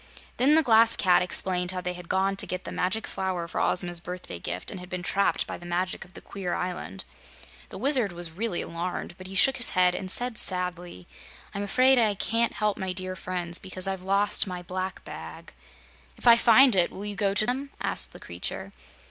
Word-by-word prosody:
Then 275 +5 +4
the 320 - +5
Glass 230 -2 +5
Cat 180 -2 +4
explained 180 0 0
how 185 0 -1
they 180 0 -3
had 180 -1 -11
gone 195 +1 +1
to - - +1
get 185 0 -4
the - - -7
Magic 200 +5 -1
Flower 185 -3 -3
for - - -3
Ozma's 175 -1 +2
birthday 180 - -7
gift 90 +1 -4
and 190 - -7
had 180 0 -11
been 180 -1 -5
trapped 200 +2 +1
by - - -7
the - - -14
magic 180 +2 -2
of 185 - -20
the - - -8
queer 190 -3 -4
island. 180 - -5 0.6
The - - -8
Wizard 250 -3 +2
was 175 -1 -4
really 200 +2 -2
alarmed, 175 +1 -5
but 185 - -9
he 195 - -8
shook 265 +6 +4
his 235 -6 -2
head 180 -1 +4
and 185 +1 -5
said 245 +3 0
sadly: 180 - -2 0.5
"I'm 200 - -4
afraid 255 +5 +4
I 215 -3 +2
can't 230 +5 0
help 210 -1 -1
my 190 -1 -2
dear 185 0 -4
friends, 175 -1 -3
because 185 0 -3
I've 190 -1 -3
lost 200 +2 +2
my 180 -1 -6
black 185 +2 -5
bag." - - -10 0.6
"If - - -8
I 235 -1 +9
find 235 +1 +6
it, 175 -2 +4
will 200 - -8
you 205 -1 -3
go 200 -1 0
to 215 - +3
them?" 265 +4 -2
asked - - +4
the - - -11
creature. 95 +3 -6
185 Hz, 215 wpm, -26 LUFS, 180-210 Hz, 0.6 s, I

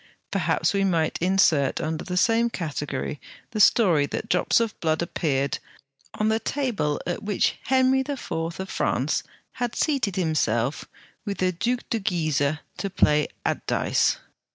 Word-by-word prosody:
Perhaps - - +1
we 200 0 +2
might 165 -5 +1
insert 170 -7 +3
under 160 0 -3
the 180 -1 -3
same 230 +4 +3
category 150 - -4 0.3
the 215 - -3
story 180 -9 +5
that 220 - -4
drops - - +3
of 230 -2 0
blood 160 -1 +1
appeared 140 -5 -1 0.6
on 215 - 0
the 220 0 +2
table 230 - -1
at 175 +2 -3
which 205 -2 0
Henry 260 0 +3
IV. 275 0 -4
of 165 +3 -3
France 145 -3 0 0.3
had 245 -2 -3
seated 265 - 0
himself 145 - 0 0.4
with 200 -2 -4
the 185 0 +1
Duc 240 +8 -1
de 230 - +1
Guise 155 -7 0 0.2
to 200 - -2
play 150 -5 +3 0.2
at - - -1
dice. - - +2
185 Hz, 150 wpm, -25 LUFS, 155-225 Hz, 0.6 s, story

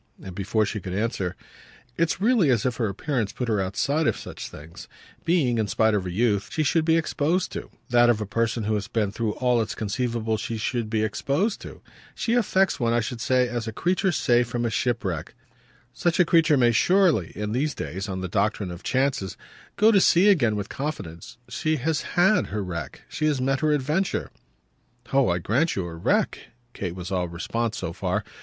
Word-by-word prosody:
And 95 - -7
before 105 +3 0
she 105 +1 -3
could 95 -1 -5
answer: 100 -4 -1 0.6
"It's 165 +2 0
really 215 - +3
as 120 -5 +2
if 125 -2 0
her 115 - 0
appearance 110 0 -2
put 125 - -3
her 105 -3 +1
outside 140 +11 0
of - - +1
such - - -7
things 75 +2 -11 0.4
being, 140 -9 +2
in 110 - 0
spite 110 +2 +2
of 100 -3 0
her - - -3
youth, 100 +1 +1
that 160 -5 +1
of 115 -3 +3
a 105 - -2
person 115 +2 -1
who 110 +1 0
has 105 -1 -2
been 110 -3 0
through 110 0 -2
all 125 -2 +2
it's 110 - -3
conceivable 115 +1 -1
she 115 +1 -4
should 115 0 -2
be 110 -1 0
exposed 145 - -1
to. - - -10 0.3
She 230 - -1
affects 195 -5 +2
one, 115 -2 +1
I 120 - +3
should 115 +1 -4
say, 125 +2 +2
as 120 -1 -4
a - - -2
creature 180 - +1
saved 120 -6 +2
from 120 0 -2
a 115 - 0
shipwreck. 100 -8 -2 0.6
Such 175 +5 0
a 180 - +6
creature 165 -3 +4
may 120 -2 +4
surely, 175 - +3
in 105 0 -3
these 140 +6 0
days, 95 +7 -5
on 95 -1 -3
the 95 - -3
doctrine 100 0 0
of 85 - -8
chances, 130 -7 -1 0.4
go 215 +2 +5
to 200 -3 +5
sea 185 +4 +5
again 120 - +3
with 100 0 -3
confidence. 100 - -6
She 155 +6 -1
has 155 +2 -1 0.2
HAD 190 +4 +4
her 105 0 -3
wreck 85 -6 -6
she 155 - -1
has 145 -3 +1
met 135 +1 +1
her 155 -1 +2
adventure." 150 +7 0 0.8
"Oh 135 -4 +4
I 85 - +1
grant 125 - +1
you 95 - -2
her 85 -1 -7
wreck!" - - +1 0.3
Kate 90 -3 -4
was 90 +1 -7
all 90 -2 0
response 110 +7 -3
so 85 - -4
far. - - -1
120 Hz, 195 wpm, -25 LUFS, 100-150 Hz, 0.8 s, a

